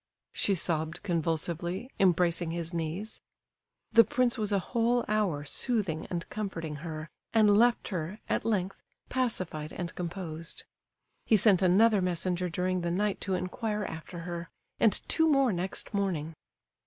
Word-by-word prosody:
she 200 - +1
sobbed 160 -2 -1
convulsively, 170 +3 -2
embracing 175 -2 +3
his 170 0 -4
knees. 170 +6 -4 0.7
The 230 - +9
prince 255 -3 +1
was 215 -3 -1
a 200 - +3 0.2
whole 240 0 +2
hour 205 -9 +1
soothing 195 - -1
and 170 -2 -4
comforting 165 -8 -4
her, 155 0 -6 0.2
and 210 -2 +6
left 240 +3 +3
her, 185 0 -3
at - - 0
length, 195 -4 -1 0.3
pacified 185 -12 -1
and 175 -2 -5
composed. 170 -2 -5 0.6
He 220 - +6
sent 200 -2 +5
another 200 +3 +5
messenger 180 0 0
during 180 +1 -1
the 170 - -1
night 200 +3 0
to 190 -2 -1
inquire 210 +4 -2
after 165 +1 -7
her, 170 0 -5 0.3
and 220 - +3
two 320 0 +3
more 275 -6 +4
next 185 +5 -3
morning. 175 -6 -1
185 Hz, 140 wpm, -30 LUFS, 170-210 Hz, 0.7 s, The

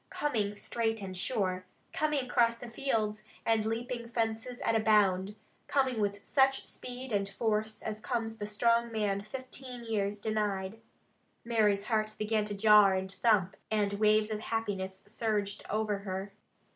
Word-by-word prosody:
Coming 215 -8 -1
straight 225 +1 -1
and 190 -1 -5
sure. 185 -2 0 0.3
Coming 300 -4 +1
across 235 -2 +3
the 235 0 -9
fields, 220 -5 -1 0.2
and 220 -1 +2
leaping 235 +1 -3
fences 230 +1 -2
at - - +1
a - - +4
bound. 205 -2 +3 0.3
Coming 265 -4 +1
with 200 0 -2
such 270 -1 +3
speed 250 +1 -8
and 200 -1 0
force 215 +1 -1
as 215 0 -4
comes 225 -1 -2
the 205 - -4
strong 230 +2 +2
man, 205 -3 0
fifteen 255 +2 -8
years 205 -2 -1
denied. 210 -1 -1 0.7
Mary's 210 -4 +2
heart 215 -2 0
began 215 0 0
to 205 -1 -4
jar, 210 -1 +6
and 190 0 -2
thump, 195 -3 +2
and 210 -2 +1
waves 215 0 +4
of 215 - -2
happiness 200 -4 -3
surged 205 -2 -1
over 215 -1 0
her. 195 0 -5
215 Hz, 150 wpm, -31 LUFS, 200-230 Hz, 0.7 s, jar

